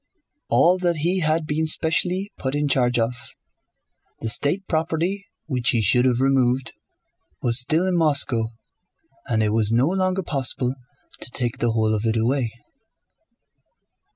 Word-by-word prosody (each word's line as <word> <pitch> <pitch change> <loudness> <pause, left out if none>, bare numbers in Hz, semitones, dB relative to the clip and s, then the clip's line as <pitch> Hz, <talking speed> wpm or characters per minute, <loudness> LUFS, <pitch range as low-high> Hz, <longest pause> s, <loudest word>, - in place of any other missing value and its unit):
All 180 +2 +4
that 175 -2 +1
he 175 +5 0
had 155 -1 0
been 155 +1 -1
specially 180 +5 +1
put 130 +1 -2
in 145 0 0
charge 125 -3 +2
of, 115 0 +1 1.1
the 115 - -2
state 150 - +1
property 165 +5 -1 0.2
which 130 -3 -1
he 120 -4 +2
should 125 +6 +3
have 125 -2 +2
removed, 130 -1 +1 0.7
was 120 0 +4
still 155 +8 +1
in 185 -1 0
Moscow 140 -8 +2 0.8
and 110 -2 +1
it 105 0 0
was 110 -1 +2
no 120 +4 +3
longer 185 +1 0
possible 130 -4 0 0.5
to - - -2
take 120 -2 -2
the 120 -1 0
whole 110 -1 +1
of 105 - -1
it 115 0 +1
away. 120 +1 0
135 Hz, 150 wpm, -22 LUFS, 120-165 Hz, 1.1 s, All